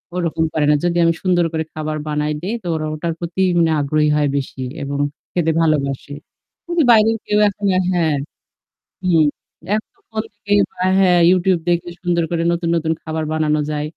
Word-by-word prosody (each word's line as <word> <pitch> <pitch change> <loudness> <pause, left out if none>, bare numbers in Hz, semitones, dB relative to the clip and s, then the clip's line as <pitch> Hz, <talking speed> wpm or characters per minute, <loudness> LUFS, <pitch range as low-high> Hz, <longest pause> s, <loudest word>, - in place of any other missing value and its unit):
ওরকম 165 -2 -1
করে 155 -2 +1
না। - - +6
যদি 175 0 +1
আমি 165 0 +4
সুন্দর 175 -2 +2
করে 160 0 0
খাবার 155 0 -3
বানায় 150 0 -1
দেই 205 +6 -3
তো - - -6
ওরা 155 0 -2
ওটার 165 +2 -3
প্রতি 175 +2 -3 0.2
মানে 165 -1 +3
আগ্রহী 150 +1 +1
হয় 145 -1 +2
বেশি 135 -1 -5 0.2
এবং 140 0 -3 0.3
খেতে 165 -2 +1
ভালোবাসে। 145 -3 0 0.5
কিন্তু 345 -2 +1
বাইরে 220 -1 +6 0.2
গেলেও 210 - +1
এখন 200 +1 -3
আর 185 - +2
হ্যাঁ, 160 -4 +1 0.9
হুম। 165 -4 +4 0.5
এখন 215 - -2
তো - - -34
phone 220 0 -3
থেকে 205 0 -3 0.2
বা 180 - -5 0.2
হ্যাঁ, 180 -2 +4
YouTube 185 -2 +2
দেখে 175 0 0
সুন্দর 175 -2 +1
করে 165 -1 0
নতুন, 170 0 -1
নতুন 160 0 0
খাবার 160 0 -3
বানানো 155 -1 +1
যায়। 150 0 -2
165 Hz, 185 wpm, -19 LUFS, 155-180 Hz, 0.9 s, না